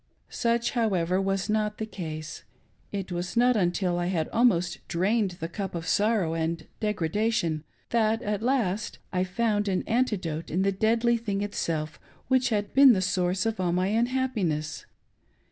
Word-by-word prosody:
Such, 235 Hz, 0 st, 0 dB
however, 190 Hz, -6 st, +1 dB
was 195 Hz, 0 st, -1 dB
not 210 Hz, 0 st, 0 dB
the 220 Hz, -, -3 dB
case. 155 Hz, -6 st, -7 dB, 0.5 s
It 195 Hz, -2 st, -4 dB
w'as 175 Hz, +4 st, -4 dB
not 245 Hz, +1 st, +5 dB
until 175 Hz, -2 st, +1 dB
t 175 Hz, -, -1 dB
had 165 Hz, -4 st, -1 dB
dmost 220 Hz, -7 st, +2 dB
drained 190 Hz, +1 st, 0 dB
the' 165 Hz, -, -3 dB
cup 190 Hz, +1 st, -5 dB
of 165 Hz, -1 st, -4 dB
sorrow 205 Hz, -6 st, +2 dB
and 165 Hz, 0 st, -2 dB
degradation 205 Hz, -5 st, 0 dB, 0.3 s
that, 225 Hz, -1 st, +2 dB
at 205 Hz, 0 st, -2 dB
last, 225 Hz, -5 st, 0 dB, 0.2 s
Ifound 205 Hz, +3 st, 0 dB
an 185 Hz, -2 st, 0 dB
antidote 190 Hz, -10 st, -1 dB
in 180 Hz, +4 st, 0 dB
the 195 Hz, -, +2 dB
deadly 230 Hz, +4 st, +2 dB
thing 205 Hz, -3 st, -2 dB
itself 160 Hz, -6 st, -3 dB, 0.3 s
which 260 Hz, -1 st, +3 dB
had 205 Hz, -3 st, -1 dB
been 270 Hz, -2 st, +8 dB
the 195 Hz, -, +1 dB
source 185 Hz, 0 st, 0 dB
of 225 Hz, -2 st, -1 dB
all 175 Hz, -2 st, +1 dB
my 185 Hz, +2 st, +1 dB
unhappineSs. 220 Hz, -, -1 dB
195 Hz, 155 wpm, -27 LUFS, 175-225 Hz, 0.5 s, been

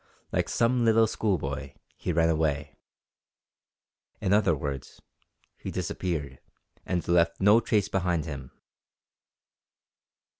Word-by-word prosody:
Like -, -, 0 dB
some 120 Hz, +1 st, +2 dB
little 115 Hz, 0 st, +5 dB
schoolboy, 70 Hz, -11 st, -2 dB, 0.2 s
he -, -, -3 dB
ran 80 Hz, 0 st, +3 dB
away! 75 Hz, -3 st, 0 dB, 1.4 s
In 95 Hz, -, +1 dB
other 100 Hz, -6 st, +4 dB
words, 70 Hz, -2 st, -6 dB, 0.6 s
he -, -, -6 dB
disappeared, 75 Hz, -8 st, -3 dB, 0.5 s
and 90 Hz, -2 st, -1 dB
left 85 Hz, -1 st, +3 dB
no 105 Hz, +4 st, +6 dB
trace 105 Hz, -4 st, +1 dB
behind 90 Hz, -6 st, 0 dB
him. 70 Hz, -4 st, -7 dB
85 Hz, 105 wpm, -27 LUFS, 70-100 Hz, 1.4 s, no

